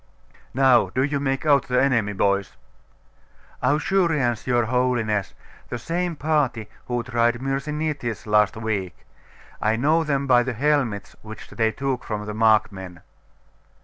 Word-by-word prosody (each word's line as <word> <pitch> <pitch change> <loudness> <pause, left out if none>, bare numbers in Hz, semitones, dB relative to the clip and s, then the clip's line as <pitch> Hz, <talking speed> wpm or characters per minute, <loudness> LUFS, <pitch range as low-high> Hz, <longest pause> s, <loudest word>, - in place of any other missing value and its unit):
Now 135 -1 +4
do 130 - 0
you 140 0 -1
make 135 +1 -2
out 140 -3 +3
the 125 0 +2
enemy, 115 -7 +1
boys?' 100 0 0 1.1
'Ausurians, 150 - +1
your 120 -2 +2
Holiness. 115 -5 0 0.3
The 120 - -3
same 170 +7 -2
party 145 -8 0 0.2
who 120 -1 -1
tried 120 -1 +1
Myrsinitis 140 -2 -3
last 105 -1 +2
week. 105 -5 -3 0.6
I 110 +1 +2
know 155 +7 +2
them 140 -3 -1
by 125 -2 +5
the 125 +1 -2
helmets 120 -6 0
which 110 0 -11
they 110 -1 +1
took 135 0 -3
from 105 -1 -4
the 105 - -5
Markmen. 105 -5 +1
125 Hz, 135 wpm, -23 LUFS, 110-140 Hz, 1.1 s, by